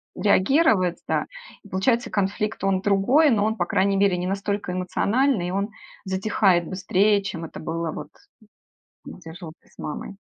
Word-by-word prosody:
реагировать, 200 Hz, -, +3 dB
да. -, -, 0 dB, 0.4 s
И 205 Hz, -, -15 dB
получается 230 Hz, +6 st, 0 dB
конфликт- 205 Hz, +2 st, -2 dB
он 195 Hz, -1 st, +1 dB
другой, 205 Hz, +11 st, +3 dB
но 210 Hz, -5 st, +2 dB
он, 220 Hz, 0 st, 0 dB
по 175 Hz, -, -1 dB
крайней 195 Hz, +3 st, +1 dB
мере, 195 Hz, -2 st, +2 dB
не 180 Hz, +1 st, -3 dB
настолько 200 Hz, -1 st, -2 dB
эмоциональный, 200 Hz, +4 st, 0 dB
и -, -, -3 dB
он 200 Hz, +2 st, -1 dB, 0.3 s
затихает 190 Hz, -2 st, +1 dB
быстрее, 200 Hz, +2 st, +2 dB
чем 170 Hz, -4 st, -5 dB
это -, -, -9 dB
было 165 Hz, 0 st, -3 dB
вот 150 Hz, -1 st, -8 dB, 1.0 s
где 165 Hz, -3 st, -10 dB
жил 165 Hz, -2 st, -9 dB
ты -, -, -29 dB
с -, -, -27 dB
мамой. 155 Hz, +6 st, -6 dB
195 Hz, 165 wpm, -23 LUFS, 180-210 Hz, 1.0 s, реагировать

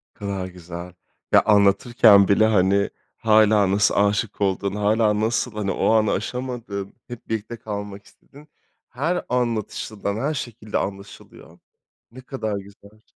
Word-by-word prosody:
Ne -, -, -31 dB
kadar 100 Hz, -2 st, -4 dB
güzel. 90 Hz, -1 st, -9 dB, 0.4 s
Ya, -, -, +6 dB
anlatırken 100 Hz, 0 st, +5 dB
bile 100 Hz, +2 st, +4 dB
hani 100 Hz, -2 st, +2 dB, 0.3 s
hâlâ 110 Hz, -3 st, +4 dB
nasıl 100 Hz, +1 st, +2 dB
aşık 105 Hz, +1 st, 0 dB
olduğunu, 100 Hz, +1 st, -1 dB
hâlâ 105 Hz, 0 st, +2 dB
nasıl, 115 Hz, +3 st, 0 dB
hani, 105 Hz, -2 st, -2 dB
o -, -, 0 dB
anı 110 Hz, -1 st, +3 dB
aşamadın, 115 Hz, -3 st, -4 dB
hep 120 Hz, -1 st, -10 dB
birlikte 110 Hz, +1 st, -4 dB
kalmak 105 Hz, -2 st, -7 dB
istedin, 145 Hz, +2 st, -19 dB, 0.4 s
her 165 Hz, +8 st, -2 dB
anlatışından 110 Hz, -4 st, -2 dB
her 140 Hz, +8 st, -1 dB
şekilde 115 Hz, -6 st, -5 dB
anlaşılıyor. 100 Hz, 0 st, -8 dB, 0.5 s
Ne 130 Hz, +2 st, -12 dB
kadar 110 Hz, -6 st, -4 dB
güzel. 100 Hz, +2 st, -14 dB
105 Hz, 130 wpm, -22 LUFS, 100-115 Hz, 0.5 s, Ya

